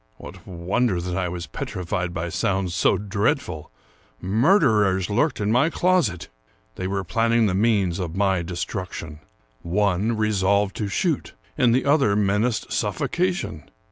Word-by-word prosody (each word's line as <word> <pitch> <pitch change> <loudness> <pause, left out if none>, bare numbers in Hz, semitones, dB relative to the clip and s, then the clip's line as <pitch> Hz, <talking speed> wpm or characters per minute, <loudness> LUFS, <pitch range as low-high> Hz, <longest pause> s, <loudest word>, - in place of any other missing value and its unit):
What - - -12
wonder 95 +3 0
that 90 +1 -4
I 90 -1 -1
was 85 0 -5
petrified 90 0 -4
by 85 0 -3
sounds 90 +2 -1
so 90 - +2
dreadful! 100 - -2 0.5
Murderers 105 - +3
lurked 130 +7 +1
in 105 0 0
my 130 +7 +3
closet. 155 - +1 0.5
They 95 - -4
were 95 0 -2
planning 115 +5 +2
the 100 - +1
means 100 -3 +1
of 85 -2 -4
my 95 -2 +1
destruction. 85 -3 -5 0.4
One 100 +4 0
resolved 100 -2 +1
to 105 - -2
shoot, 155 - -1 0.2
and 125 -2 +3
the 130 - +1
other 140 -8 +3
menaced 105 +3 0
suffocation. 180 - -2
100 Hz, 140 wpm, -23 LUFS, 90-115 Hz, 0.5 s, Murderers